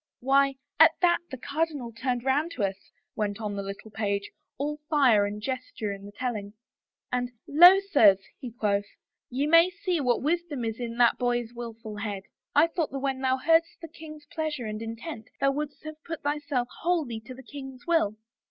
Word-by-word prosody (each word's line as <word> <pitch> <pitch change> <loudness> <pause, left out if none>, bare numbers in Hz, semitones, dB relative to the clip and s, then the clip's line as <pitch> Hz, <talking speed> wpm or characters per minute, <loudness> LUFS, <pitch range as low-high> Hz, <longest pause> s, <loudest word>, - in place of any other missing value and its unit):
" - - -66
Why, 275 +1 +3 0.2
at - - +8
that 345 -1 +5
the 260 - -6
cardinal 285 -3 -2
turned 245 +1 -2
round 280 +5 +1
to 215 - -2
us," 195 0 -3 0.3
went 205 -1 -2
on 210 -2 -3
the 200 0 -4 0.2
page, 200 -2 -2 0.3
all 295 +2 -2
fire 250 -9 +4
and 205 +1 -5
gesture 255 -2 -4
in 200 0 -10
the - - -10
telling, 210 -3 -4 0.3
" - - -61
and, 245 0 0
* - - -56
Lo, 355 +6 +9
sirs,' 220 - +4
he 250 - -6
quoth, 205 -3 0 0.3
* - - -60
ye 265 +3 -1
may 330 +3 +6
see 360 -1 -2
what 250 -2 +1
wisdom 310 -5 -1
is 225 +1 -3
in 235 -1 -4
that 240 -1 +4
boy's 240 -1 0
willful 230 -2 -7
head. 205 -2 -4 0.3
I 295 - +7
thought 335 -2 -2
that 275 - -5
when 270 -1 -2
thou 260 0 +2
heardest 330 +4 +2
the. 330 - -8
king's 310 -2 -11
pleasure 300 -5 -3
and 215 0 -4
intent 225 +2 -6
thou 275 - +3
wouldest 295 +2 -5
have 310 0 -9
put 330 -1 -6
thyself 290 -4 -1
wholly 315 -10 0
to 255 - -8
the 265 - -12
king's 265 -1 -9
will.' 325 -12 +2
260 Hz, 200 wpm, -27 LUFS, 225-300 Hz, 0.3 s, Lo